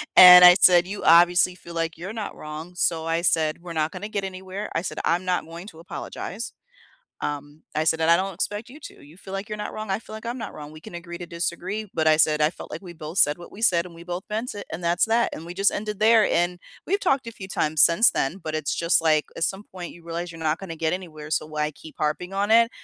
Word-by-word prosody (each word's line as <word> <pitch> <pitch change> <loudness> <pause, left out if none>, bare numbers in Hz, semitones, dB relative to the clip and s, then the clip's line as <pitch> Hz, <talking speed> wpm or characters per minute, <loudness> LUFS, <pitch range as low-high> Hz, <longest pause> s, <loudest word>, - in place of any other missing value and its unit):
And 180 -1 +11
I 180 0 +10
said, 180 0 +6
"You 200 +1 -6
obviously 175 +2 +5
feel 170 -2 -12
like 165 -1 -2
you're 185 +6 -7
not 220 -2 -5
wrong," 155 +3 -8
so 165 -2 0
I 165 +1 0
said, 160 -1 +1
"We're 175 -1 -8
not 155 0 -1
gonna 210 - -7
get 200 -2 -3
anywhere," 190 +2 -6
I - - 0
said, - - -5
"I'm 175 +2 +1
not 180 -1 0
going 170 +4 -10
to 160 -6 -13
apologize." 195 +5 -7 0.7
Um, 145 +1 -5
I 155 +1 0
said, 160 0 +1
"And 160 +1 +3
I 170 - +7
don't 190 +1 -3
expect 205 +5 -3
you 285 +5 -13
to, - - -12
you 150 +4 -16
feel 190 0 -11
like 195 +3 -5
you're 210 - -4
not - - -5
wrong, 215 -2 -6
I 190 - 0
feel 215 -1 -12
like 220 - -8
I'm 240 +2 -3
not 225 - -6
wrong, 150 -1 -9
we 155 - -12
can - - -11
agree 175 0 -7
to 175 - -6
disagree," 175 +5 -4
but 160 -1 0
I 155 - +5
said, 155 -1 +3
"I 150 - +4
felt - - -11
like - - -7
we 180 -2 -9
both 160 +3 -7
said 145 +3 +4
what 175 - -12
we 220 - -11
said, 175 -5 +3
and 170 - -13
we 170 +1 -12
both 180 +1 -5
meant 225 +3 -3
it, 205 - -8
and 170 +2 -6
that's 170 +5 +2
that," 230 +1 +2
and 165 - -9
we 175 - -8
just 195 +2 +3
ended 210 -1 -4
there, 220 0 +5
and 175 +1 0 0.3
we've 400 +3 0
talked 275 -10 +1
a 230 - -6
few 190 -4 -10
times 155 -4 +2
since 175 +8 +6
then, 135 +7 -2
but 155 -1 -5
it's 155 -2 -2
just 170 +1 +2
like, 155 -2 +2
at - - 0
some 195 +3 -3
point, 180 -2 -9
you 170 - -16
realize 170 +1 -5
you're 165 - -11
not 155 0 0
gonna 175 -4 -8
get 160 +1 -1
anywhere, 155 -5 -7
so 155 - 0
why 150 0 -2
keep 155 +2 -14
harping 155 +5 -2
on 205 +2 -1
it? 230 +1 +5
175 Hz, 275 wpm, -24 LUFS, 160-195 Hz, 0.7 s, And